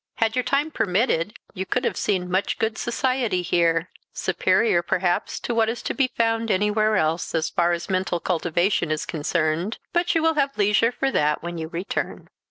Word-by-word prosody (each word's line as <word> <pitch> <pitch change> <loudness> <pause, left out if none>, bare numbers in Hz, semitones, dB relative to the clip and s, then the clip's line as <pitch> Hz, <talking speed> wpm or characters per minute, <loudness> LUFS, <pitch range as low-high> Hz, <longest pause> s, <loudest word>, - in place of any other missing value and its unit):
Had 225 0 0
your 250 - +2
time 275 +5 0
permitted, 200 - 0 0.2
you 190 - -3
could 250 +6 -1
have - - 0
seen 180 -3 -1
much 185 +2 0
good 220 -1 -1
society 235 -5 0
here; 170 0 +1 0.2
superior, 190 +1 +2
perhaps, 175 0 -1
to 240 - -2
what 225 -1 +2
is 235 0 -4
to - - -2
be 270 -2 +1
found 225 0 +1
anywhere 210 +2 +2
else, 160 +1 0
as 160 -1 0
far 175 0 +2
as 170 0 -2
mental 185 -2 0
cultivation 175 +1 0
is 155 -1 -1
concerned. 160 +5 -1 0.2
But 345 0 +1
you 325 - +2
will 325 0 +4
have 280 -2 0
leisure 210 +3 +3
for 270 +2 -1
that 150 - +1
when 170 -1 -5
you 160 - -4
return." 170 +4 -4
190 Hz, 185 wpm, -24 LUFS, 175-230 Hz, 0.2 s, will